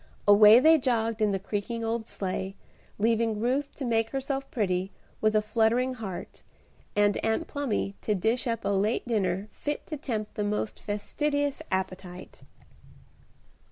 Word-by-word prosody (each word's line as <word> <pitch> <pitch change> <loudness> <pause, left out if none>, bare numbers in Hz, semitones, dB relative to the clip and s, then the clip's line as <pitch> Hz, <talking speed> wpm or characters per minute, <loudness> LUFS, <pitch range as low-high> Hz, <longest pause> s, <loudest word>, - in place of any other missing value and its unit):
Away 210 +2 +9
they 320 +3 +6
jogged 230 -3 0
in 215 - +4
the 195 - 0
creaking 210 +4 -3
old 225 0 -2
sleigh, 190 0 -3 0.4
leaving 225 0 +1
Ruth 265 +5 0
to 275 - -4
make 225 -1 +1
herself 270 +1 -3
pretty, 190 -4 -1 0.3
with 215 0 +2
a 215 - +3
fluttering 230 +4 +2
heart, 205 -7 -7 0.5
and 205 0 +3
Aunt 225 +8 0
Plumy 275 -10 -2
to 210 - 0
dish 225 +7 0
up 230 -1 -2
a - - +1
late 200 +5 0
dinner 195 -3 0
fit 295 0 -4
to 305 - -5
tempt 220 -6 -4
the 210 - -2
most 210 +1 -2
fastidious 285 +8 -1
appetite. 185 -1 -4
220 Hz, 150 wpm, -28 LUFS, 205-250 Hz, 0.5 s, Away